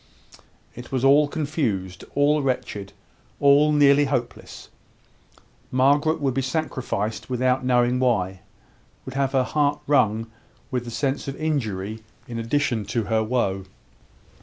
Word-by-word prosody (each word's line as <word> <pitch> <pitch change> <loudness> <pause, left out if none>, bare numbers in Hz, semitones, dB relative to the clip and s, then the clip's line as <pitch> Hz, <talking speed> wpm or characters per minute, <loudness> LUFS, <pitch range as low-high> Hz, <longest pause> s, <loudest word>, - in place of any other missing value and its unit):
It 120 +1 -11
was 130 -2 -1
all 145 +2 +6
confused 125 - -3
all 145 +1 +3
wretched 105 -7 -3 0.5
all 145 +2 +5
nearly 145 -1 +5
hopeless. 125 -4 -4 1.0
Margaret 145 +5 +2
would 135 -3 0
be 135 - 0
sacrificed 120 -7 -3
without 130 +1 +1
knowing 125 0 +2
why 95 -7 0 0.7
would 130 - -7
have 135 0 0
her 130 -1 +3
heart 145 +2 0
wrung 115 -6 +2 0.5
with 125 -2 -2
the - - -6
sense 135 +4 -2
of 135 - -4
injury 110 -9 -2 0.3
in 115 -1 -5
addition 115 -1 0
to 115 +2 -1
her 110 +1 0
woe. 105 -5 -1
130 Hz, 130 wpm, -23 LUFS, 115-145 Hz, 1.0 s, all